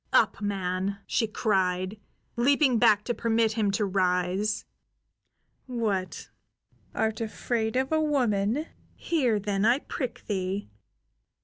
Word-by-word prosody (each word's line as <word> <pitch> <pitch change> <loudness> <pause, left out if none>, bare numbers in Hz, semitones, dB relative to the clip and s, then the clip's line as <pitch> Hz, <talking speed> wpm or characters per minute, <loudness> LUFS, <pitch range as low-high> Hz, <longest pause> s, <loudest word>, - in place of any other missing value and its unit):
"Up, - - +3
man!" 195 -1 -2
she 225 - 0
cried, 190 -2 0 0.4
leaping 260 0 +3
back 215 -3 +5
to 240 - -1
permit 230 -1 +1
him 215 -2 0
to 205 +2 0
rise. 185 +2 0 1.0
"What, 215 -7 -2 0.6
art 220 0 0
afraid 225 +1 -2
of 265 +2 0
a 315 0 +3
woman? 250 -3 +1 0.3
Here, 255 -10 +1
then, 200 -1 -1
I 235 +4 +5
prick 260 -3 -5
thee! 190 - -3
215 Hz, 115 wpm, -27 LUFS, 195-240 Hz, 1.0 s, back